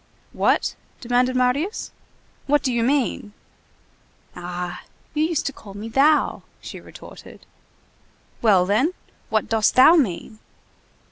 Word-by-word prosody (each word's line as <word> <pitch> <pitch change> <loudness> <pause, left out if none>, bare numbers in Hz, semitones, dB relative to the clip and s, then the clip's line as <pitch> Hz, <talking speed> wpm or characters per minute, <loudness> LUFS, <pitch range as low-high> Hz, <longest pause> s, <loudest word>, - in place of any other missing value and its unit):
"What?" - - +1 0.3
demanded 250 +1 +1
Marius. 255 - 0 0.6
"What 290 +1 +2
do 255 - 0
you 235 - 0
mean?" 245 -5 0 1.0
"Ah! 180 0 -6 0.3
you 305 0 +1
used 325 -2 -1
to 280 - -2
call 200 -5 -13
me 215 +3 -7
thou," 290 +6 +2 0.2
she - - -9
retorted. - - -13 1.0
"Well, 195 -6 +4
then, 235 - +1 0.4
what 220 -1 0
dost 220 -1 +1
thou 260 +6 +8
mean?" 220 - -1
245 Hz, 120 wpm, -22 LUFS, 210-280 Hz, 1.0 s, thou